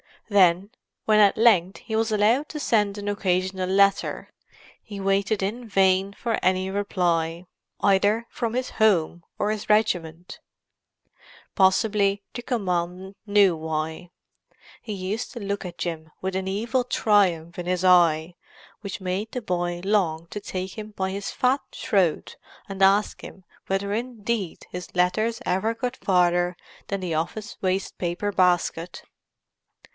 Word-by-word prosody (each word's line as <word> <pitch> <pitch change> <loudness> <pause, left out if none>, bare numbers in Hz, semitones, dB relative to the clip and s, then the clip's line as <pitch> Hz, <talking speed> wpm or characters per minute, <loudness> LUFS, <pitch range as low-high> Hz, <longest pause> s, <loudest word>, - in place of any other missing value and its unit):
Then, 190 0 +4 0.3
when 215 -1 +4
at 205 -2 +5
length 200 -5 +4
he 220 - -5
was 220 0 +1
allowed 220 +8 +2
to 300 - -6
send 210 -6 +1
an 205 0 -4
occasional 185 -2 -1
letter, 200 +1 +2 0.5
he 205 -2 -9
waited 195 +1 0
in 230 +5 -3
vain 195 -1 +2
for 230 +2 -2
any 185 +1 +1
reply, 175 -4 -1 0.4
either 205 +3 +3
from 230 -1 -3
his 255 +1 -2
home 175 -6 +2
or 210 - 0
his 215 -1 -5
regiment. 180 -6 0 1.1
Possibly 200 +1 +2
the 240 - -5
commandant 185 -4 -3
knew 200 -3 +4
why; 160 +2 -4 0.7
he 215 - -6
used 200 +7 -4
to 240 - -6
look 200 -1 -3
at 175 -1 -7
Jim 165 -2 -4
with 190 0 -3
an 190 0 -2
evil 235 +6 -1
triumph 185 -8 +1
in 175 - -4
his 180 0 -1
eye 170 -2 +4 0.5
which 200 -1 -6
made 190 +4 -3
the 250 - -3
boy 175 -3 -2
long 175 -5 0
to 210 - -6
take 185 -1 -6
him 215 0 -8
by 190 -2 -3
his 200 +1 -4
fat 260 +2 +1
throat 185 -6 0 0.3
and 195 -1 -7
ask 195 +2 +3
him 190 - -11 0.2
whether 195 +1 -1
indeed 225 -5 -3
his 180 +1 -8
letters 215 +6 +1
ever 200 +5 0
got 250 +2 -3
farther 175 -1 +2 0.3
than 200 -1 -3
the 175 -3 -3
office 175 +8 -3
waste 190 +1 -1
paper 180 +4 -2
basket. 180 -2 +1
195 Hz, 145 wpm, -24 LUFS, 180-210 Hz, 1.1 s, at